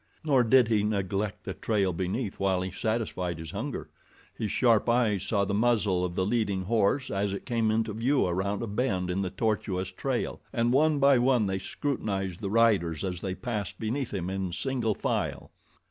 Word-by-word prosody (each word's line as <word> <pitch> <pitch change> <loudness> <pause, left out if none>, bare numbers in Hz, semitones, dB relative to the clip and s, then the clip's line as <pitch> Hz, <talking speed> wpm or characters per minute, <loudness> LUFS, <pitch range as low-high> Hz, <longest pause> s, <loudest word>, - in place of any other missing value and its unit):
Nor 140 -5 +4
did 120 +1 +5
he 110 -2 +2
neglect 100 -1 -1
the - - -4
trail 100 -5 0
beneath 95 +5 -3
while 95 -2 +1
he 95 - -4
satisfied 95 -5 -2
his 80 -1 -7
hunger. 115 +9 -4 0.5
His 105 - -3
sharp 115 -2 +3
eyes 110 -5 +2
saw 100 -1 +1
the 100 - -2
muzzle 105 -4 +2
of 90 -1 -3
the 95 - +1
leading 100 -3 0
horse 115 +6 +1
as 100 0 0
it 100 - -6
came 115 -3 +1
into 110 0 0
view 125 +6 +2
around 95 +4 -1
a - - -3
bend 100 -5 -1
in 95 +2 -1
the 95 - -1
tortuous 95 -3 -1
trail, 125 +6 -2
and 120 0 +1
one 150 +2 +4
by 140 -2 +5
one 125 -3 +3
they 95 -1 -1
scrutinized 95 -6 -3
the 100 -3 -3
riders 100 -8 +2
as 90 -2 -3
they 95 -1 -3
passed 105 0 -4
beneath 120 +4 -2
him 90 -4 -3
in 95 -2 -2
single 120 +1 -1
file. - - -2
105 Hz, 190 wpm, -28 LUFS, 95-120 Hz, 0.5 s, did